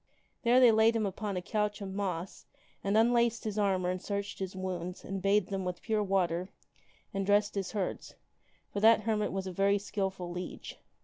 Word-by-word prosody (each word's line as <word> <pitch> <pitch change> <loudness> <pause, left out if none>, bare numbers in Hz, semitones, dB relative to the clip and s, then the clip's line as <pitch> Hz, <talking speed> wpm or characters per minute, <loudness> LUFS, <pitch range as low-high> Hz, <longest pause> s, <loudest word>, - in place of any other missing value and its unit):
There 245 0 +5
they 245 -2 +8
laid 220 +1 +4
him 220 -2 +1
upon 200 0 -3
a 180 - -3
couch 210 +1 -1
of 195 -2 -6
moss 190 -3 -4 0.4
and 200 +2 +2
unlaced 235 0 +3
hermit. 215 - -2
his 210 - -3
armor 190 -3 +1
and 185 0 -4
searched 200 0 -4
his 190 -1 -4
wounds 180 -1 -5
and 195 0 -4
bathed 200 0 +2
them 195 -1 -2
with 180 -1 -4
pure 220 -2 +1
water 185 -2 0 0.6
and 195 0 -1
dressed 205 +1 +3
his 195 0 -3
hurts, 200 -4 -3 0.6
for 200 - -1
that 220 +1 +6
hermit 210 -1 0
was 190 0 -3
a 190 - -4
very 195 +2 +2
skilful 195 -3 -3
leech. 180 +1 -7
200 Hz, 195 wpm, -31 LUFS, 185-215 Hz, 0.6 s, they